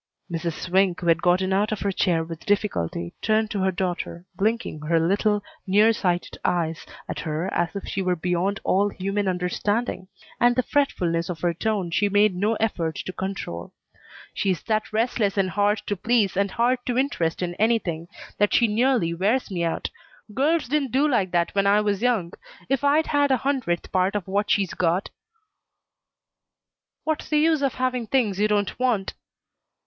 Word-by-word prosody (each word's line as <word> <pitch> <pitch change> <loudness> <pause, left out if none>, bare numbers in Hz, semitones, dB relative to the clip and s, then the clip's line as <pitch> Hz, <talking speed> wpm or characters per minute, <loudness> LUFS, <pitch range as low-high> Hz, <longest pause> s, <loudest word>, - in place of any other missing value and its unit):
Mrs. 165 0 -2
Swink, 185 0 +1
who - - -5
had 165 -1 +3
gotten 185 +2 +2
out 205 +2 +1
of 215 - -3
her 200 - 0
chair 175 -3 +1
with 165 0 -8
difficulty, 85 - -1
turned 220 0 +1
to 205 - -2
her 190 0 +2
daughter, 175 -1 -3
blinking 220 -5 -1
her 165 +2 +2
little, 205 +4 +1 0.2
near 210 +4 +5
sighted 180 -4 -2
eyes 165 -2 -1 0.2
at - - -4
her 155 +3 -3
as 170 +2 -1
if 200 - -5
she 195 - -2
were 180 -1 +1
beyond 180 +4 -1
all 200 +2 +2
human 195 +1 -2
understanding; 185 +3 -1 0.3
and 245 0 +4
the 255 - +2
fretfulness 175 - 0
of 165 -3 -5
her 175 -1 +1
tone 195 -1 -1
she 205 +4 +2
made 205 0 +4
no 210 +5 +1
effort 175 -8 -1
to 185 - -5
control. 190 - -5 0.6
"She's 185 -6 -1
that 215 -1 -1
restless 220 -2 0
and 190 -1 +1
hard 205 +2 +1
to 205 - -1
please 220 0 +1
and 200 +1 +1
hard 240 +5 +1
to 245 -1 0
interest 185 -12 0
in 175 -1 -2
anything 195 -7 +1 0.3
that 205 0 +3
she 235 - +4
nearly 220 -5 +2
wears 205 +7 0
me 175 -2 -1
out. 165 - -2 0.4
Girls 300 +5 +1
didn't 275 -2 0
do 280 +3 +3
like 225 -10 +1
that 175 -1 0
when 200 0 +2
I 205 +1 +5
was 205 -1 0
young. 225 -9 +1 0.4
If 270 +1 0
I'd 295 +3 +3
had 285 -1 +2
a 265 - +3
hundredth 255 -12 -1
part 185 +2 +1
of 200 -3 -2
what 205 +2 0
she's 195 -3 +1
got 180 +2 0 1.0
" - - -64
"What's 315 -1 -2
the 300 - +2
use 315 0 +3
of 275 -3 0
having 255 -2 -1
things 215 -6 +1
you 210 - +3
don't 205 +1 0
want?" 240 -7 0
200 Hz, 185 wpm, -24 LUFS, 180-230 Hz, 1.0 s, near